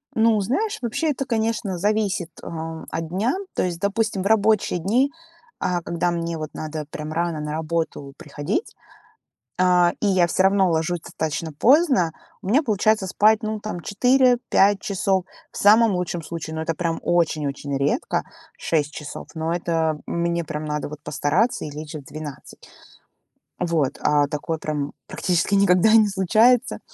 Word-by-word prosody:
Ну, 220 -1 +4
знаешь, 395 - -1
вообще 250 +7 -1
это, 270 0 -3
конечно, 220 -5 -1
зависит, 205 -3 0
э, - - -10 0.4
от 165 0 -4
дня. 215 - 0 0.2
То - - +1
есть, 175 -2 -2
допустим, 200 0 0
в - - 0
рабочие 215 -4 +2
дни, 245 - +2 0.5
э, 180 -1 0
когда 175 +1 -1
мне 170 -1 -3
вот 155 -1 -6
надо 155 -1 -5
прям 155 0 -6
рано 170 -2 -1
на 150 0 -4
работу 160 -3 -3
приходить, 150 - -4 0.8
а, 180 -1 +4
и 210 - +2
я 185 -3 +3
всё 185 - +1
равно 195 -1 +4
ложусь 165 +1 0
достаточно 160 +1 -4
поздно, 255 - +3 0.3
у - - -7
меня 260 +10 +4
получается 215 -2 +1
спать, 215 +3 +3
ну, 215 0 -3
там, 205 -5 -5
4-5 245 -3 +3
часов 190 -1 0 0.3
в - - -10
самом 220 +2 +6
лучшем 175 -1 -2
случае, 160 0 -6
но 160 - -3
это 165 0 -2 0.3
очень-очень 150 -4 0
редко 140 +1 0 0.3
6 150 -2 -1
часов, 150 -1 -8
но 160 +1 -2
это 165 -3 0
мне 170 0 -1
прям 150 0 -5
надо, 150 -1 -3
вот, 150 -1 -8
постараться 155 - 0
и 150 - -6
лечь 155 +1 -8
в 145 - -7
12. 150 -1 -10 0.9
Вот, 160 -6 0
а 145 -1 +3
такое 150 +2 -3
прям 150 -2 -3
практически 180 +2 0
никогда 195 +1 +4
не 220 -2 +6
случается. 220 +6 +3
175 Hz, 155 wpm, -23 LUFS, 155-215 Hz, 0.9 s, самом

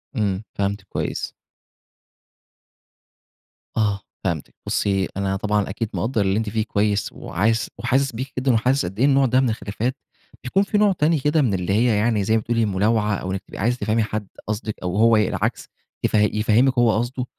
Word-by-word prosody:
إمم، 100 -2 0
فهمتِك 100 +1 -2
كويس. - - -3 2.4
آه، 105 -3 +1 0.2
فهمتِك 85 -6 -3
بُصّي، 95 -2 0
أنا 95 -1 0
طبعًا 105 +1 0
أكيد 105 +3 -3
مقدر 115 -1 0
اللي 95 +1 +1
أنتِ 110 -1 -1
فيه 110 0 0
كويس، 105 -1 0
وعايز 110 +5 0
وحاسس 130 +3 +1
بيكِ 130 +4 -5
جدًا 130 -1 +2
وحاسس 125 +3 +2
قد 95 +4 -6
إيه 130 - +5
النوع 140 -1 +4
ده 130 0 +3
من 130 - +2
الخلافات، 110 +4 -3 0.5
بيكون 190 +11 +2
في 205 +1 0
نوع 205 -1 +4
تاني 160 -3 +2
كده 150 +3 +2
من 120 -8 +1
اللي 95 +1 -1
هي 115 0 +3
يعني 110 -1 +1
زي 110 +3 +2
ما 110 - +2
بتقولي 115 0 0
ملاوعة، 105 +1 +1
أو 95 0 -4
إنك 95 - -3
تبقي - - -10
عايزة 120 +5 +1
تفهمي 110 0 +1
حد 110 -1 -4 0.2
قصدِك 110 0 -3
أو 90 +1 -2
هو 115 0 +5
ي 105 - +3
العكس - - -2 0.4
يف - - 0
يفهّمِك 110 +5 +3
هو 115 -3 +4
قصده، 125 +2 -2
110 Hz, 185 wpm, -22 LUFS, 100-125 Hz, 2.4 s, إيه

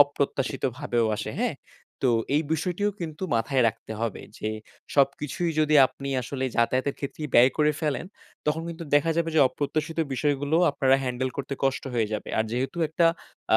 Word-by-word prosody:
অপ্রত্যাশিতভাবেও 135 -3 +1
আসে। - - -4
হ্যাঁ? - - 0 0.5
তো - - +4 0.2
এই 155 - +3
বিষয়টিও 180 +6 0
কিন্তু 160 +1 -6
মাথায় 125 +3 +1
রাখতে 110 0 -7
হবে, 115 -4 -2 0.2
যে 110 - -2 0.5
সবকিছুই 150 +5 +1
যদি 155 0 +3
আপনি 140 +1 -8
আসলে 130 +2 -3
যাতায়াতের 130 +4 +1
ক্ষেত্রেই 150 +2 -5
ব্যয় 125 +2 +7
করে 150 0 +4
ফেলেন, 150 -1 -1 0.4
তখন 160 +2 +1
কিন্তু 165 0 -6
দেখা 145 +3 +4
যাবে 165 -1 +1
যে - - +6
অপ্রত্যাশিত 155 +4 -3 0.2
বিষয়গুলো 145 +3 +1
আপনারা 135 -1 +3
হ্যান্ডেল 130 0 -1
করতে 140 0 -3
কষ্ট 135 -1 +1
হয়ে 110 -3 +1
যাবে। 105 - -4
আর 110 - +3
যেহেতু 130 +6 -2
একটা 165 +2 +3 0.5
আ - - +8
140 Hz, 165 wpm, -26 LUFS, 130-155 Hz, 0.5 s, আ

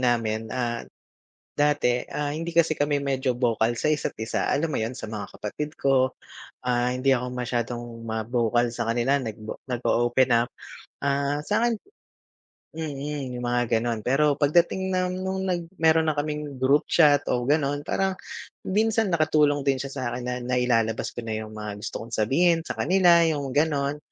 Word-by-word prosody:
namin, 115 -3 0
ah, 120 0 -2 0.8
dati, 145 -4 +2
ah, 145 -1 -3
hindi 165 +3 -4
kasi 160 -2 +3
kami 145 -1 +1
medyo 130 -2 0
vocal 120 -1 +1
sa 150 - 0
isa't 150 -1 -1
isa, 110 - -1
alam 160 +3 +1
mo - - -1
'yun, 110 +3 -2
sa 110 - -7
mga 105 -2 -6
kapatid 150 +9 -5
ko, 130 -1 +2 0.5
ah, 125 0 +1
hindi 130 +2 +1
ako 125 -1 +2
masyadong 120 -1 -2 0.2
ma-vocal 115 +1 0
sa 115 - -3
kanila, 120 +5 +2
nag 110 -5 -5 0.3
nag-o-open 120 0 +1 0.2
up. - - -20 0.5
Ah, 140 +1 0
sa'kin 225 +7 0 1.0
mm, 145 -3 -4
'yung 125 - -5
mga 120 0 +1
gano'n, 115 -1 -2
pero 145 +3 +3
pagdating 175 +5 +2
na 185 0 +1
no'ng 190 +1 -3
nag 175 -2 0 0.2
meron 160 0 +4
na 155 - +2
kaming 150 -2 -4
group 140 +3 +4
chat 145 -4 +4
o 125 - 0
gano'n, 145 -1 +1
parang 190 +5 0 0.5
minsan 220 +1 +2
nakatulong 155 -4 +2
din 135 -2 +1
siya 135 - -5
sa'kin 125 -2 -3
na 125 - -2
nailalabas 120 -3 +1
ko 120 - -6
na 110 - -3
'yung 110 - -8
mga 105 -1 -6
gusto 110 - -5
kong 115 - -13
sabihin 165 +10 +3
sa - - -6
kanila, 175 -2 +5
'yung 145 -4 -1
gano'n. 145 0 +1
135 Hz, 165 wpm, -25 LUFS, 120-155 Hz, 1.0 s, kanila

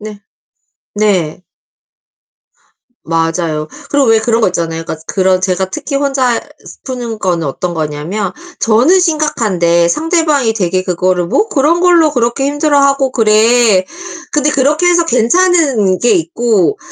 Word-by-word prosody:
네. 210 -1 -9 0.7
네. 185 -6 -1 1.6
맞아요. 165 -1 -2 0.2
그리고 285 -3 +1
왜 225 -1 +4
그런 230 +1 0
거 - - +3
있잖아요. 165 -2 -4
그니까 160 -1 -7
그런 185 -1 +1
제가 185 0 -1
특히 285 +2 -5
혼자 270 -4 0 0.4
푸는 240 -4 -5
거는 170 -4 -1
어떤 175 +6 -4
거냐면 155 +5 -4 0.3
저는 245 +12 +3
심각한데 210 - +1
상대방이 300 - 0
되게 185 -3 -1
그거를 180 -1 -1
"뭐 420 - 0
그런 315 -2 +1
걸로 345 -4 +3
그렇게 245 +1 -1
힘들어하고 280 -2 +1
그래." 220 -2 +3 0.5
근데 295 0 +1
그렇게 295 +6 +1
해서 345 -1 +3
괜찮은 260 - +2
게 240 - +2
있고 240 - 0
230 Hz, 280 characters per minute, -13 LUFS, 185-290 Hz, 1.6 s, 왜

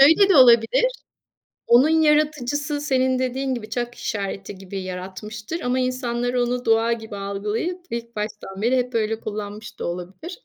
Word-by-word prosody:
Şöyle 325 +8 +7
de - - +6
olabilir: 240 - +6 0.8
Onun 250 +6 +6
yaratıcısı 300 -2 +2
senin 260 -2 +1
dediğin 260 +1 -1
gibi 215 -2 -7
"çak 240 0 -3
işareti" 195 -1 -4
gibi 195 0 -6
yaratmıştır 210 - -6
ama 250 +1 0
insanlar 245 -1 -1
onu 245 0 0
doğa 225 +1 +3
gibi 220 -3 -7
algılayıp 210 - -3
ilk 235 0 -5
baştan 210 -2 -5
bile 245 +4 +3
hep 250 -1 -1
öyle 220 0 0
kullanmış 210 0 -7
da - - -3
olabilir. 185 - -6
240 Hz, 150 wpm, -23 LUFS, 210-260 Hz, 0.8 s, Şöyle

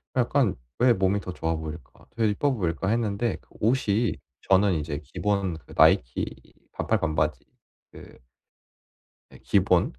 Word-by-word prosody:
약간 125 -3 +2 0.2
'왜 125 0 +5
몸이 95 0 +1
더 90 -2 -6
좋아 80 -1 -2
보일까? 80 +1 -9
되게 115 -2 +1
이뻐 140 +7 +1
보일까?' 95 - -2
했는데 115 0 0
그 - - -31
옷이 115 -1 +1 0.3
저는 95 0 +5
이제 75 -2 -3
기본 100 -4 -1
그 80 - -15
나이키 60 +1 +3 0.4
반팔 - - 0
반바지 80 -1 -1 0.5
그 - - -14 1.1
네 - - -15
기본. - - +3
100 Hz, 260 characters per minute, -26 LUFS, 80-115 Hz, 1.1 s, 왜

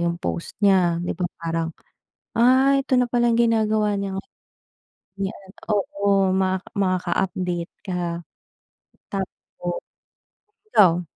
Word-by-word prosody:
'yong 170 0 0
post 170 -1 -4
niya, 180 -4 +4
'di - - -1
ba, 180 - -1 0.2
parang, 165 0 -1 0.7
"Ay, 260 +3 +5
ito 260 - +2
na 250 - +3
pala 240 0 +2
ang 230 - +2
ginagawa 215 -2 +2
niya." 195 -1 -3
O - - -7 1.0
'yan, 195 -1 -5 0.2
oo, 200 -1 +2
maka 190 0 0
makaka-update 180 -2 -1
ka. 175 -2 -2 0.9
Tapo 180 -2 -5 0.9
ikaw? 180 -4 +5
190 Hz, 115 wpm, -23 LUFS, 175-210 Hz, 1.0 s, Ay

